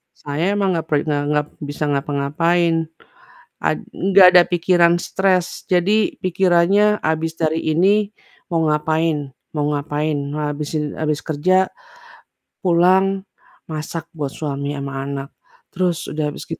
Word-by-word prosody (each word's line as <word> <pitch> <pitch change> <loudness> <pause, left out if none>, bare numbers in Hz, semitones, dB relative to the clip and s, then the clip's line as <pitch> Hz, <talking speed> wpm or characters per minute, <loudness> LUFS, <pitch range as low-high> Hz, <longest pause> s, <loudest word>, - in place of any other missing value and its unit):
s - - -26
saya 145 +3 -2
emang 195 -2 +1
nggak 165 - -1
pe 150 - +2
nggak 145 -1 0
ngap 150 0 +1 0.2
bisa 150 +1 -4
ngapa-ngapain, 150 +5 +1 0.9
a - - +3
nggak 190 0 +4
ada 180 - +9
pikiran 175 0 +4
stres, 185 -2 0
jadi 200 +5 +2
pikirannya 185 +3 +3
abis 160 +1 -1
dari 160 0 +1
ini 200 +5 +3 0.4
mau 165 -1 +1
ngapain? 150 -2 0 0.3
Mau 145 - +1
ngapain? 150 +1 -2 0.2
Habis 150 0 -3
in 150 - -1 0.2
habis 150 -1 0
kerja, 185 +5 +2 1.0
pulang 190 +2 +3 0.5
masak 155 +1 -5
buat 140 -2 -3
suami 140 -1 -3
sama 140 0 -5
anak, 140 0 -5 0.4
terus 180 -2 0
udah 155 0 -2
habis - - -8
git 165 - -5
165 Hz, 135 wpm, -20 LUFS, 150-185 Hz, 1.0 s, ada